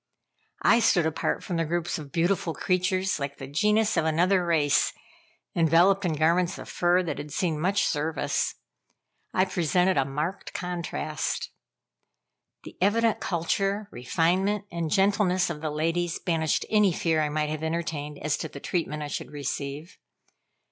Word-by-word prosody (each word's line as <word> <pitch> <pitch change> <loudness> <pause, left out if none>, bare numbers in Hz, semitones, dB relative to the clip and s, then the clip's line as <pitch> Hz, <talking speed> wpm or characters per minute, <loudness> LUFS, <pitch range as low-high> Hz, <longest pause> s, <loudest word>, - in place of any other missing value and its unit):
I - - +6
stood 190 -7 +3
apart 160 -1 -1
from 175 - -3
the 165 - +1
groups 170 +1 -2
of 145 -2 -9
beautiful 175 +1 0
creatures 185 -1 0
like 140 0 -4
the 135 - -7
genus 210 +9 +2
of - - +3
another 180 +4 +3
race, 155 -4 +2 0.6
enveloped 175 +4 +4
in 170 - +1
garments 170 +4 +2
of - - -9
fur 175 +1 +2
that 165 - -4
had 145 0 -7
seen 160 0 -1
much 190 +5 +1
service. 155 +1 -1 0.8
I 185 - +2
presented 180 0 +1
a 135 - +3
marked 150 +8 -4
contrast. 170 -4 -3 1.1
The - - -11
evident 225 +3 +3
culture, 195 +4 -1
refinement, 185 +11 0
and 170 -2 -2
gentleness 190 -1 +2
of 150 -3 -6
the 155 - -2
ladies, 165 +3 -1
banished 160 -3 0
any 210 -3 +4
fear 160 -1 +1
I 150 - 0
might 150 0 -1
have 155 0 -4
entertained 160 -3 -3
as 150 0 0
to - - -5
the 140 - -9
treatment 150 -2 -2
I - - -4
should 145 - -5
receive. 145 +3 -5
170 Hz, 155 wpm, -26 LUFS, 155-185 Hz, 1.1 s, I